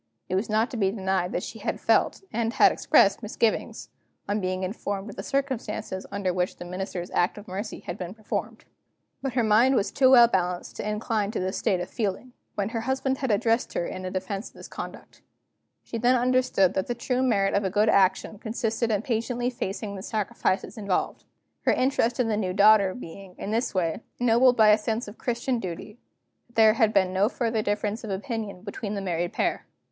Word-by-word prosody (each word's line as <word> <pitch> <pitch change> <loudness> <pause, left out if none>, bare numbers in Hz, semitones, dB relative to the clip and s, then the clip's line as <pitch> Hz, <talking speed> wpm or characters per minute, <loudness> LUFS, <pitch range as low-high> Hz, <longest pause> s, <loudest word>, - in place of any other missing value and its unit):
It - - -3
was 195 +5 0
not 220 +3 +1
to 245 - -4
be 195 -3 +2
denied 190 -3 -1
that 180 - -1
she 225 - -7
had 215 - -3
felt, - - +2
and 230 0 0
had - - +6
expressed, 200 +2 +3
misgivings, 220 0 -1 0.4
on 205 +1 0
being 185 0 -2
informed 200 +1 -4
of - - -12
the - - -5
circumstances 260 -8 -3
under 195 -3 -1
which 180 0 -1
the - - -9
Minister's 180 0 -5
act 175 +3 +1
of 205 - -10
mercy 200 +4 -5
had 175 - -6
been 180 +2 -6
performed. 215 -2 -5 0.6
But 270 -3 -3
her 245 -2 +2
mind 225 +5 +4
was 200 - +1
too 260 -1 +4
well 240 -3 +8
balanced 180 -4 -2
to 210 - -3
incline 210 -1 -1
to - - -3
this 185 +1 -2
state 185 - +1
of 180 - -4
feeling, 225 +3 -3 0.2
when 200 0 -1
her 225 -1 -3
husband 265 +2 -1
had 265 - -2
addressed 225 +3 +1
her 170 - 0
in 185 +1 -5
defense 195 +3 -4
of - - -29
his - - -10
conduct. - - -9 0.6
She 230 - -5
then 245 +2 +4
understood 250 -6 +2
that 190 - -1
the 240 - -2
true 250 +2 -1
merit 205 -6 +2
of 200 - +2
a 190 - 0
good 210 +3 +2
action 200 +1 +2
consisted 225 0 -1
in 210 -1 0
patiently 240 +1 -1
facing 200 -3 -4
the 190 - -6
sacrifices 210 +1 -2
involved. 200 -3 -2 0.4
Her - - +3
interest 255 -2 +1
in 250 - +2
the 215 -2 0
new 185 -4 -1
daughter 200 -1 +5
being, 190 -3 -10
in 205 - -5
this 230 -1 -1
way, 170 +1 0 0.2
ennobled 245 +1 +4
by 215 -1 +6
a 210 +1 +6
sense 220 +2 -2
of 205 - -11
Christian 240 +1 -1
duty, 190 +4 -7 0.5
there 220 -2 +5
had 220 -2 +3
been 190 -3 +2
no 195 +3 +3
further 230 -3 -1
difference 210 +2 -2
of 220 - -6
opinion 200 -2 -4
between 205 0 -5
the 200 - -3
married 175 -2 -2
pair. - - -1
210 Hz, 205 wpm, -26 LUFS, 190-235 Hz, 0.6 s, well